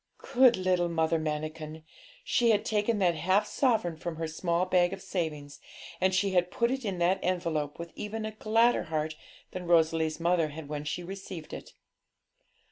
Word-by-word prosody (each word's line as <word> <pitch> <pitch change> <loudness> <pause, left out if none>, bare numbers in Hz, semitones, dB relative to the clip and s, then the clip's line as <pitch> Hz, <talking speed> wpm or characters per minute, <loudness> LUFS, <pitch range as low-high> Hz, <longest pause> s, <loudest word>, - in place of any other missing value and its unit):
Good 250 -2 +6
little 180 -2 +1
Mother 160 0 +1
Manikin! 155 0 -4 0.4
she 240 - +2
had 210 -2 +3
taken 210 +1 +1
that 180 -4 +3
half 185 +6 +2
sovereign 220 - +1
from 170 +1 -5
her 165 0 -3
small 170 +2 0
bag 180 0 +2
of 195 - -7
savings, 155 -7 -4 0.4
and 190 - +3
she 195 +1 +2
had 180 -1 +2
put 235 +4 0
it 265 0 -2
in 195 -4 -2
that 175 +2 +2
envelope 165 -5 -1
with 170 0 -7
even 215 +1 -4
a 215 - -3
gladder 225 +1 +2
heart 155 -1 -2 0.4
than 180 -1 -6
Rosalie's 160 -1 +2
mother 170 -1 +2
had 150 0 -8
when 150 0 -5
she 175 +4 -3
received 190 -3 -8
it. - - -9
175 Hz, 175 wpm, -29 LUFS, 160-195 Hz, 0.4 s, Good